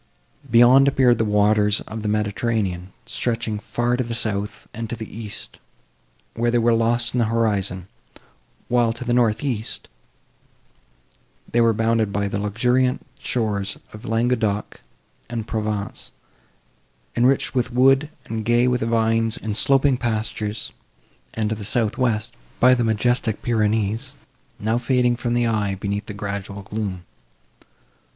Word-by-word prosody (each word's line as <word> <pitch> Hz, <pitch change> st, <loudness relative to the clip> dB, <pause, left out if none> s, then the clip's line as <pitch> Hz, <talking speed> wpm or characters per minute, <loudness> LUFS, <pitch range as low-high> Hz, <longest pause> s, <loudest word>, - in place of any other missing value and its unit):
Beyond, 120 Hz, +4 st, +7 dB
appeared 130 Hz, -3 st, +4 dB
the 110 Hz, -, +2 dB
waters 105 Hz, 0 st, +3 dB
of 110 Hz, +1 st, -7 dB
the 105 Hz, -, -3 dB
Mediterranean, 105 Hz, -3 st, -1 dB
stretching 115 Hz, -2 st, -2 dB
far 120 Hz, +3 st, -1 dB
to 125 Hz, -, 0 dB
the 115 Hz, -1 st, -4 dB
south, 105 Hz, -2 st, -3 dB
and 115 Hz, -1 st, -5 dB
to 120 Hz, -, -3 dB
the 110 Hz, -2 st, -9 dB
east, 110 Hz, -2 st, -7 dB, 0.7 s
where 120 Hz, +1 st, 0 dB
they 120 Hz, -, +2 dB
were 120 Hz, 0 st, +3 dB
lost 120 Hz, +1 st, +1 dB
in 125 Hz, -, +1 dB
the 115 Hz, -, +3 dB
horizon; 100 Hz, -5 st, 0 dB, 0.8 s
while, 120 Hz, -2 st, +2 dB
to 125 Hz, +2 st, -7 dB
the 120 Hz, -, 0 dB
north 120 Hz, 0 st, +2 dB
east, 120 Hz, -6 st, -3 dB, 1.6 s
they 120 Hz, -, +3 dB
were 115 Hz, -1 st, +5 dB
bounded 110 Hz, -1 st, +1 dB
by 100 Hz, 0 st, 0 dB
the 100 Hz, 0 st, -2 dB
luxuriant 125 Hz, +5 st, +1 dB
shores 105 Hz, -6 st, -1 dB, 0.2 s
of 105 Hz, +2 st, -10 dB
Languedoc 115 Hz, -3 st, 0 dB, 0.5 s
and 115 Hz, -2 st, -4 dB
Provence, 105 Hz, -2 st, -3 dB, 1.0 s
enriched 130 Hz, +3 st, +2 dB
with 125 Hz, -1 st, 0 dB
wood, 135 Hz, +4 st, +4 dB, 0.2 s
and 110 Hz, 0 st, -4 dB
gay 120 Hz, +2 st, +3 dB
with 125 Hz, 0 st, +1 dB
vines 115 Hz, 0 st, +1 dB
and 105 Hz, -1 st, -4 dB
sloping 135 Hz, +2 st, +3 dB
pastures; 110 Hz, -3 st, -2 dB, 0.6 s
and, 110 Hz, -1 st, 0 dB
to -, -, 0 dB
the 105 Hz, -, -8 dB
south 110 Hz, +2 st, 0 dB
west, 110 Hz, -4 st, 0 dB, 0.3 s
by 125 Hz, +1 st, +6 dB
the 120 Hz, -1 st, +2 dB
majestic 115 Hz, 0 st, 0 dB
Pyrenees, 110 Hz, -1 st, 0 dB, 0.4 s
now 110 Hz, +3 st, 0 dB
fading 125 Hz, -1 st, +2 dB
from 120 Hz, 0 st, -2 dB
the 120 Hz, 0 st, +2 dB
eye, 105 Hz, -4 st, 0 dB
beneath 100 Hz, +2 st, -3 dB
the 105 Hz, -, -6 dB
gradual 100 Hz, -1 st, -5 dB
gloom. 95 Hz, -4 st, -4 dB
115 Hz, 145 wpm, -22 LUFS, 105-120 Hz, 1.6 s, Beyond